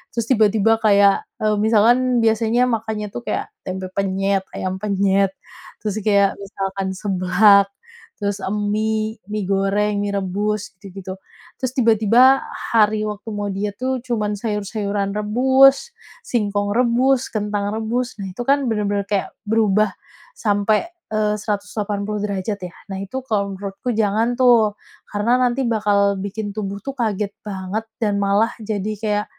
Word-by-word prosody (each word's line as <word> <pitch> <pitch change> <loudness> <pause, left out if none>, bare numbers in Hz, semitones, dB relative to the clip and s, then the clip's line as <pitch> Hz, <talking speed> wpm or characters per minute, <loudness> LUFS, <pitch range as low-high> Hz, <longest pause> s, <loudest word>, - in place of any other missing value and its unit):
terus 230 - 0
tiba-tiba 220 -1 +3
kayak, 200 -2 +4 0.2
eee, 215 0 +2
misalkan 235 +3 +3
biasanya 225 +2 +2
makannya 220 -3 -2
tuh 240 +3 -8
kayak - - -2 0.2
tempe 185 0 -4
penyet, 195 0 0
ayam 185 0 -3
penyet, 195 -1 +1 0.5
terus 215 0 -2
kayak 200 -2 +2
misalkan 195 -1 -4
seblak, 195 +1 +4 0.5
terus 200 0 -1 0.3
mi 220 +1 -1 0.2
mi 205 -3 -2
goreng, 200 +1 +1
mi 200 0 -2
rebus, 200 +1 -2
gitu-gitu. 190 0 -9 0.4
Terus 255 -1 -2
tiba-tiba 235 +2 +5 0.4
hari 215 -1 +4
waktu 210 +1 -6
mau 205 -1 -3
diet 200 +1 -3
tuh 260 0 0
cuman 210 -4 -1
sayur-sayuran 205 -1 -2
rebus, 265 - +4 0.3
singkong 205 - -1
rebus, 250 +2 +2
kentang 205 -1 -2
rebus, 235 +3 -2
nah 195 - -4
itu 185 +6 -7
kan 275 -1 +2
bener-bener 205 -2 0
kayak 200 -2 -1 0.2
berubah 215 -1 +3 0.5
sampai, 205 +2 +1 0.2
eee, 215 -1 +1
180 205 0 -3
derajat 200 0 -3
ya. 180 -2 -7 0.2
Nah, - - -4
itu 200 +7 -4
kalau 200 -5 -1
menurutku 195 +5 -5
jangan 225 +3 +1
tuh. 230 -5 +4 0.3
Karena 230 +5 +1
nanti 250 +1 +1
bakal 205 -3 +2
bikin 205 +1 -4
tubuh 200 -1 -4
tuh 275 - -3
kaget 210 -4 -1
banget 200 +1 -4 0.2
dan 205 -2 +1
malah 200 +3 +2
jadi 215 -1 -3
kayak 210 -1 0
210 Hz, 135 wpm, -20 LUFS, 200-225 Hz, 0.5 s, tiba-tiba